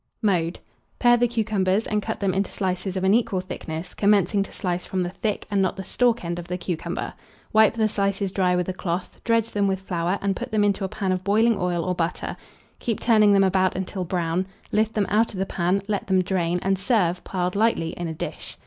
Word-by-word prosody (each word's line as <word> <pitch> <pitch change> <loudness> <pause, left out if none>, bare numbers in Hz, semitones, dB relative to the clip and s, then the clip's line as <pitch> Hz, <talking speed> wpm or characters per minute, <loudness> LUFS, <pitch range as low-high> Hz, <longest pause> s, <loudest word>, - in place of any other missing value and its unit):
Mode. 175 -4 +1 0.4
Pare 240 -1 +5
the 240 0 +3
cucumbers 215 -3 +1
and 210 0 0
cut - - -4
them 195 -2 +1
into 195 +1 0
slices 185 0 -2
of 185 - -2
an 190 +1 +4
equal 230 -4 +2
thickness, 170 -2 -6
commencing 200 -1 +3
to 195 - -4
slice 180 -1 -2
from 185 -1 -2
the 175 - -3
thick, 210 +2 -2
and 200 -1 +2
not 185 - +1
the 190 - -6
stalk 240 -1 +1
end 170 +1 -3
of 175 - -8
the 180 0 -3
cucumber. 175 -2 -4 0.4
Wipe 220 0 +5
the 220 -1 +2
slices 200 -2 -1
dry 185 -2 +2
with 180 -1 0
a 185 - -2
cloth, 180 -1 -4
dredge 230 -1 +1
them 205 -1 +1
with 190 -1 0
flour, 180 0 -1
and 195 -1 0
put - - -5
them 215 -1 +2
into 200 -1 +1
a 190 - -1
pan 190 0 -2
of 185 0 -1
boiling 220 +4 +3
oil 180 -3 -1
or 185 - 0
butter; 170 0 -2 0.4
Keep 230 -3 -2
turning 215 -3 +5
them 195 -1 +5
about 185 -1 +2
until 190 0 -3
brown; 175 +1 -1 0.2
lift 220 +1 +1
them 210 -2 +2
out 215 +2 +2
of - - -7
the 190 - +1
pan, 190 +2 0
let 205 -2 -2
them 190 -1 +3
drain, 175 -2 0
and 195 0 +1
serve, 185 -5 +1
piled 180 -1 -2
lightly 205 -6 +2
in 175 +1 -5
a 160 - -4
dish. - - -6
190 Hz, 230 wpm, -24 LUFS, 180-210 Hz, 0.4 s, Pare